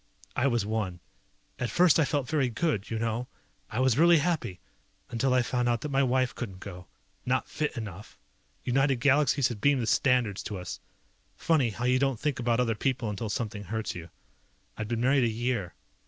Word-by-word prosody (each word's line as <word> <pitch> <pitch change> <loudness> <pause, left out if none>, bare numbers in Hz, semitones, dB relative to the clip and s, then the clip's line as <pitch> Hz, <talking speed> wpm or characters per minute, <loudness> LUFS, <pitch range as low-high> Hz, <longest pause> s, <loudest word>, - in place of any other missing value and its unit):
I 130 +3 +2
was 120 -5 +1
one. 105 -5 -2 0.6
At 125 - -1
first 175 -3 +5
I 155 - +4
felt 140 -3 -1
very 140 -3 +1
good, 120 - -1
you 115 - -2
know? 115 +2 -2 0.4
I 115 - -3
was 130 0 +3
really 170 +1 +7
happy. 145 - -1 0.5
Until 125 +3 +1
I 125 -1 +4
found 125 0 0
out 120 -1 0
that 150 - -4
my 135 0 +3
wife 130 -2 +1
couldn't 100 -7 -6
go. 90 -2 -9 0.4
Not 130 +1 0
fit 150 -3 -3
enough. 105 -3 -7 0.5
United 135 +2 +2
Galaxies 140 +1 +3
had 110 -4 -6
beamed 140 -3 +3
the - - 0
standards 120 -5 +2
to 105 - -5
us. 90 0 -6 0.6
Funny 150 -7 +2
how 120 +3 -4
you 125 +1 +3
don't 135 -4 +1
think 145 -3 -1
about 120 0 +1
other 120 -2 +2
people 120 -1 -1
until 105 +2 -4
something 105 -1 -3
hurts 110 +3 -3
you. 85 -1 -8 0.7
I'd 110 - -4
been 115 0 -2
married 135 +1 +4
a - - +2
year. 115 -4 -2
120 Hz, 195 wpm, -28 LUFS, 110-135 Hz, 0.7 s, really